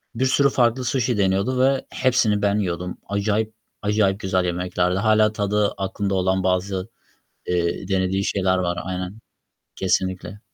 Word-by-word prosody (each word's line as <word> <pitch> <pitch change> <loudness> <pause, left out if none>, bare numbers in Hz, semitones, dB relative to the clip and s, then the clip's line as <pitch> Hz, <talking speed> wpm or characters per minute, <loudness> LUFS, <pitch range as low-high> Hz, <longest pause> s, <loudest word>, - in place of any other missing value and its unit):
Bir 130 +3 +1
sürü 140 +2 +3
farklı 125 0 +1
suşi 120 -2 0
deniyordu 100 +6 +1
ve 135 0 +2
hepsini 120 -5 +2
ben 100 +1 +2
yiyordum. 90 -2 -3
Acayip 105 +2 0 0.3
acayip 105 -2 +1
güzel 95 -2 0
yemeklerdi. 90 0 0
Hâlâ 110 +1 +4
tadı 105 0 +1
aklımda 100 0 -2
olan 95 0 +1
bazı, 95 +2 -1 0.6
eee, 90 +1 -1
denediği 95 0 0
şeyler 95 -2 +1
var. 90 -1 -1
Aynen. 90 +2 -5 0.6
Kesinlikle. 95 +1 -1
100 Hz, 135 wpm, -22 LUFS, 95-110 Hz, 0.6 s, Hâlâ